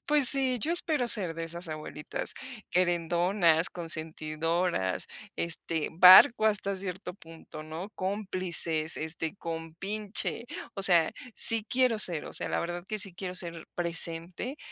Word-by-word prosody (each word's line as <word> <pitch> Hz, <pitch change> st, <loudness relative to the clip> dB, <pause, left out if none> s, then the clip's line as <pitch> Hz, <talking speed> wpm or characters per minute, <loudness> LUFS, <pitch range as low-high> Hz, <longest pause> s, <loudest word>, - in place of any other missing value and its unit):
pues 295 Hz, -4 st, +6 dB
sí, 265 Hz, -2 st, +4 dB
yo 325 Hz, -, -2 dB
espero 310 Hz, -7 st, 0 dB
ser 185 Hz, -8 st, +4 dB
de 165 Hz, 0 st, -6 dB
esas 170 Hz, +1 st, -5 dB
abuelitas, 155 Hz, -1 st, -7 dB, 0.4 s
querendonas, 175 Hz, 0 st, 0 dB
consentidoras, 160 Hz, -, -3 dB, 0.3 s
este, 165 Hz, -1 st, -3 dB
barco 190 Hz, -, +7 dB
hasta 200 Hz, -2 st, -1 dB
cierto 185 Hz, -1 st, -7 dB
punto, 165 Hz, -3 st, -13 dB
¿no?, 160 Hz, +6 st, -9 dB
cómplices, 185 Hz, -5 st, -1 dB
este, 160 Hz, +2 st, -6 dB
compinche, 190 Hz, +8 st, -5 dB, 0.3 s
o 195 Hz, -, -6 dB
sea, 170 Hz, -4 st, +6 dB, 0.2 s
sí 225 Hz, -2 st, +6 dB
quiero 250 Hz, -3 st, 0 dB
ser, 170 Hz, -7 st, +2 dB
o -, -, -10 dB
sea, -, -, -1 dB
la -, -, -3 dB
verdad 175 Hz, +1 st, -6 dB
que 215 Hz, -, -4 dB
sí 190 Hz, -2 st, 0 dB
quiero 180 Hz, 0 st, -7 dB
ser 170 Hz, -2 st, -2 dB
presente, 170 Hz, -, +1 dB
175 Hz, 135 wpm, -27 LUFS, 165-200 Hz, 0.4 s, barco